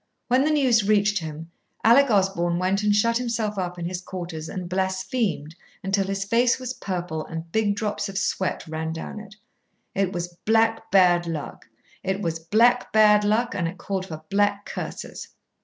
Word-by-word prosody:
When 255 +2 +4
the 305 - +2
news 255 -9 +3
reached 210 -1 +3
him, 160 0 -7 0.3
Alec 260 +5 +6
Osborn 190 -4 +2
went 185 +3 +1
and 210 0 +2
shut 230 +3 +2
himself 225 -4 -2
up 180 -1 -3
in 170 - -4
his 180 +1 -3
quarters 170 -4 -6
and 185 -2 -5
blasphemed 190 - -1 0.3
until 195 0 0
his 195 0 -2
face 235 +4 +3
was 255 -1 -4
purple 175 -7 -4
and 165 0 -7
big 210 -1 +1
drops 205 -1 -2
of 195 - -5
sweat 190 -2 -1
ran 160 0 -3
down 165 +6 -6
it. 210 0 -12 0.6
It 195 -2 0
was 175 -1 -5
black 225 0 +2
bad 175 -3 +4
luck 160 -3 -6 0.3
it 190 +1 -2
was 165 -4 -2
black 230 +9 +3
bad 210 -1 +5
luck, 225 +4 +1
and 170 -2 -1
it 175 +3 -6
called 190 -1 -3
for 155 -2 -8
black 205 0 +1
curses. - - -6
195 Hz, 175 wpm, -24 LUFS, 175-215 Hz, 0.6 s, Alec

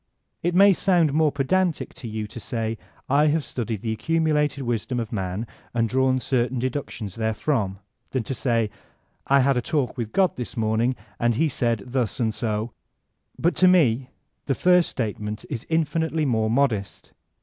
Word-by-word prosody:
It 175 +1 0
may 200 +1 +7
sound 175 -6 +2
more 155 -1 +3
pedantic 160 +5 0
to 120 - -8
you 110 -1 -3
to 110 +3 -9
say, 115 -2 -3 0.3
''I 145 +3 +4
have 155 0 0
studied 115 -4 -4
die 115 - -1
accumulated 150 +2 +1
wisdom 120 +1 -2
of 115 -3 -4
man, 95 +1 -2 0.3
and 115 -1 +2
drawn 130 +2 +2
certain 125 +1 0
de 130 +2 0
ductkms 115 -8 -5
therefrom, 110 -2 -1 0.3
than 130 -3 -1
to 135 - -4
say 115 -4 0 0.6
''I 140 0 +6
had 135 0 +3
a - - +2
UDc 140 -2 -1
with 115 -3 -3
God 190 -2 +2
this 125 -1 -6
morning 115 +3 +1 0.2
and 120 -1 +2
he 160 +7 +2
said 120 -6 -1
thus 125 -1 -1
and 110 -3 +1
so''; 110 +1 -2 0.7
but 170 - +2
to 185 - +6
me 135 -9 +4 0.4
the 135 - +1
first 180 +2 +4
statement 105 -2 -4
is 120 -6 -4
infinitely 160 0 0
more 110 -4 +1
modest. 115 -6 0
125 Hz, 170 wpm, -24 LUFS, 110-150 Hz, 0.7 s, may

